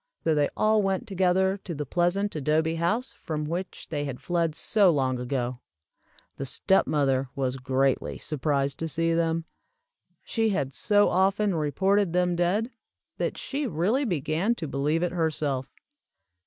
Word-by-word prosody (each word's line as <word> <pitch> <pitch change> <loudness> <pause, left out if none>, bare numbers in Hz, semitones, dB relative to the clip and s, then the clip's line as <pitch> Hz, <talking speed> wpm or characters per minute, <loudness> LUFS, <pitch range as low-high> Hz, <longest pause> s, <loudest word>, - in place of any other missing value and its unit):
So 160 - +2
they 145 -1 +2
all 215 0 +3
went 195 -1 -1
together 190 0 +2
to 180 -4 -7
the 150 0 -4
pleasant 175 +7 0
adobe 155 +2 +1
house 215 +10 0
from 155 -2 -5
which 175 +4 -5
they 145 -2 -2
had 135 -3 -5
fled 170 -3 -1
so 200 +3 +4
long 130 -5 +1
ago. 125 -1 -2 0.8
The 135 - -4
step 190 +8 +2
mother 135 -3 +1
was 135 -2 -1
greatly 130 +1 0
surprised 140 -2 -1
so 165 - -2
see 165 +2 0
them. 165 0 0 0.8
She 225 -1 0
had 140 -9 -1
so 205 - +3
often 195 +2 +2
reported 190 +5 +1
them 180 -1 +2
dead, 195 +8 0 0.5
that - - -1
she 280 0 -3
really 210 - +1
began 175 - 0
to 160 - -5
believe 150 +4 0
it 175 - 0
herself. 150 -6 -1
165 Hz, 155 wpm, -26 LUFS, 145-190 Hz, 0.8 s, so